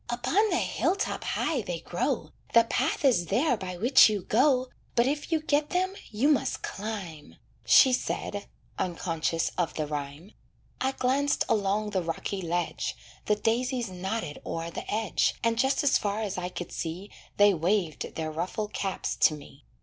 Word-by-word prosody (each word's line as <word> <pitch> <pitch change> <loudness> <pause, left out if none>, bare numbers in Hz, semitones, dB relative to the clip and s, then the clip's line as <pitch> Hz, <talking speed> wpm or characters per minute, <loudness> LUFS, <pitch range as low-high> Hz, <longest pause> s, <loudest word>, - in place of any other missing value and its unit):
"Upon 255 - +1
the - - +1
hill 365 - +1
top 395 - -3
high 275 -6 0
they 175 -5 -4
grow, 180 - -2 0.2
The 230 - +8
path 250 +5 0
is 200 -11 +3
there 250 - +2
by 185 -4 -6
which 240 +5 +7
you 205 -3 -2
go, 255 +3 +3 0.3
But 235 - +4
if 290 +5 -2
you 325 - +3
get 300 0 +1
them 370 +1 0 0.2
you 225 +6 +1
must 300 -3 +1
climb," 195 -8 -6 0.3
She 260 -2 +7
said, 205 -4 -2 0.3
unconscious 165 -2 -1
of 175 - 0
the 155 - -1
rhyme. 145 +5 -6 0.5
I 265 +1 +1
glanced 270 +3 +1
along 210 0 +1
the 190 -2 0
rocky 170 +3 -3
ledge; 175 0 -2 0.3
The 210 - +4
daisies 235 +2 0
nodded 185 -3 -4
o'er 165 0 -4
the - - -6
edge, 215 -1 +1
And 230 0 +1
just 265 +4 +2
as 285 - +4
far 205 +1 -2
as 200 -3 -3
I 180 -1 -3
could 175 -1 -7
see 175 +5 -5 0.3
They 205 0 +6
waved 175 -2 -1
their 160 -1 -3
ruffled 185 +6 -3
caps 195 -1 -2
to 155 - +4
me. 145 -1 -14
210 Hz, 170 wpm, -28 LUFS, 175-255 Hz, 0.5 s, The